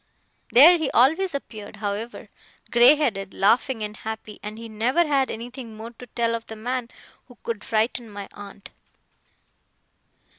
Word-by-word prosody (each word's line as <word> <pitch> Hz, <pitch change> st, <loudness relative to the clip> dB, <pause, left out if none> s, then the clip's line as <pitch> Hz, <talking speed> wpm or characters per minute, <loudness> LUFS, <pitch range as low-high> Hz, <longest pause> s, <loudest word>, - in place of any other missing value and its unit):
There 330 Hz, +7 st, +8 dB
he 310 Hz, -4 st, 0 dB
always 320 Hz, +7 st, +3 dB
appeared, 215 Hz, -7 st, -7 dB
however, 215 Hz, +3 st, -5 dB, 0.4 s
grey 240 Hz, +5 st, +7 dB
headed, 200 Hz, -10 st, -2 dB
laughing, 225 Hz, +4 st, +2 dB
and 210 Hz, 0 st, -5 dB
happy; 220 Hz, -1 st, -7 dB
and 210 Hz, +1 st, -7 dB
he 230 Hz, 0 st, -8 dB
never 240 Hz, +10 st, +1 dB
had 275 Hz, -3 st, +1 dB
anything 235 Hz, -1 st, -8 dB
more 225 Hz, +2 st, -8 dB
to 245 Hz, +1 st, -13 dB
tell 230 Hz, 0 st, -1 dB
of 230 Hz, 0 st, -4 dB
the 220 Hz, -, -7 dB
man 245 Hz, +2 st, -3 dB, 0.4 s
who 245 Hz, -2 st, -17 dB
could 225 Hz, -3 st, -4 dB
frighten 225 Hz, +1 st, -1 dB
my 205 Hz, -1 st, -8 dB
aunt. 200 Hz, -1 st, -12 dB
230 Hz, 150 wpm, -24 LUFS, 215-255 Hz, 0.4 s, There